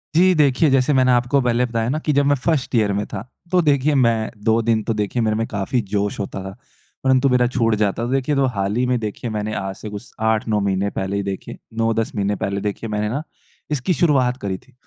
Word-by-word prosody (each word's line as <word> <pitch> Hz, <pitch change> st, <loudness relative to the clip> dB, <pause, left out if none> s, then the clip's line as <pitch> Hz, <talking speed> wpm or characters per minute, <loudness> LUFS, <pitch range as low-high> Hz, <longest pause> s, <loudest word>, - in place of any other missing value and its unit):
जी। 185 Hz, +2 st, +5 dB
देखिए, 145 Hz, +2 st, +4 dB
जैसे 135 Hz, +2 st, +3 dB
मैंने 130 Hz, -1 st, +4 dB
आपको 120 Hz, +3 st, +3 dB
पहले 125 Hz, 0 st, +2 dB
बताया 115 Hz, -1 st, -1 dB
ना 150 Hz, +4 st, 0 dB
कि 155 Hz, -, -1 dB
जब 140 Hz, 0 st, +3 dB
मैं 145 Hz, 0 st, +4 dB
फ़र्स्ट 140 Hz, -1 st, -1 dB
ईयर 105 Hz, -3 st, +3 dB
में 105 Hz, +1 st, -1 dB
था 95 Hz, -, -3 dB, 0.3 s
तो 180 Hz, -1 st, +4 dB
देखिए 145 Hz, -1 st, +2 dB
मैं 115 Hz, -4 st, +2 dB, 0.2 s
2 115 Hz, +1 st, +4 dB
दिन 110 Hz, -2 st, +3 dB
तो 115 Hz, -, -1 dB
देखिए 105 Hz, +3 st, -1 dB
मेरे 110 Hz, -1 st, +1 dB
में 115 Hz, +1 st, 0 dB
काफ़ी 105 Hz, +4 st, -1 dB
जोश 100 Hz, 0 st, 0 dB
होता 95 Hz, -1 st, -4 dB
था। 95 Hz, 0 st, -7 dB, 0.5 s
परंतु 130 Hz, +1 st, +3 dB
मेरा 125 Hz, -1 st, +3 dB
छूट 115 Hz, -1 st, +2 dB
जाता 105 Hz, +3 st, 0 dB
तो -, -, -3 dB
देखिए 135 Hz, +2 st, +1 dB
तो 135 Hz, -1 st, +3 dB
हाल 100 Hz, +1 st, -1 dB
ही 125 Hz, +2 st, +1 dB
में 125 Hz, -, +2 dB
देखिए 110 Hz, +2 st, -4 dB
मैंने 110 Hz, 0 st, -3 dB
आज 95 Hz, 0 st, -4 dB
से 105 Hz, -, -8 dB
कुछ 105 Hz, +2 st, -9 dB, 0.2 s
8-9 110 Hz, -1 st, +1 dB
महीने 100 Hz, 0 st, 0 dB
पहले 95 Hz, +1 st, -2 dB
ही 100 Hz, -, -1 dB
देखिए 100 Hz, -1 st, -5 dB, 0.2 s
9-10 115 Hz, 0 st, 0 dB
महीने 100 Hz, 0 st, 0 dB
पहले 100 Hz, +1 st, -2 dB
देखिए 105 Hz, +2 st, -4 dB
मैंने 105 Hz, 0 st, -1 dB
ना 140 Hz, +6 st, -2 dB, 0.5 s
इसकी 150 Hz, +5 st, 0 dB
शुरुआत 130 Hz, -7 st, +2 dB
करी 95 Hz, -2 st, -2 dB
थी। -, -, -24 dB
115 Hz, 235 wpm, -21 LUFS, 105-130 Hz, 0.5 s, जी